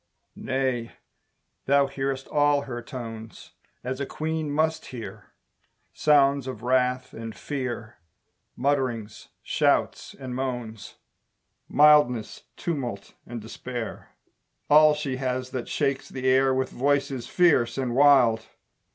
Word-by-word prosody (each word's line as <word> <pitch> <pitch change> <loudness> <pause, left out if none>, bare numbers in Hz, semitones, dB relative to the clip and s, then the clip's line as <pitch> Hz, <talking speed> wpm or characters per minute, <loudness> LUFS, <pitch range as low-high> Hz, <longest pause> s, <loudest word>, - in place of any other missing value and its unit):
Nay, 130 -3 -2 0.7
thou 140 +1 +4
hearest 135 -1 -3
all 145 -1 +2
her 120 -3 -6
tones, 115 -3 -9 0.3
As 130 +1 -4
a 140 - -1
Queen 160 -1 -3
must 160 +2 0
hear! 120 -4 -8 0.7
Sounds 140 -3 +3
of 125 -4 -6
wrath 125 0 +1
and 115 0 -7
fear, 120 -5 -5 0.6
Mutterings, 125 -6 -2 0.2
shouts, - - 0
and 130 -2 -6
moans, 120 -5 -5 0.7
Mildness, 145 -6 +4
tumult, 125 - -4
and 120 0 -6
despair, 115 +1 -7 0.6
All 155 0 +7
she 140 -3 -3
has 130 -1 -3
that 125 -2 -4
shakes 140 -2 -1
the 130 -1 -4
air 135 +1 +4
With 130 0 -1
voices 140 -1 0
fierce 135 -11 +3
and 130 -3 -1
wild! 125 -5 +5
130 Hz, 115 wpm, -26 LUFS, 120-140 Hz, 0.7 s, All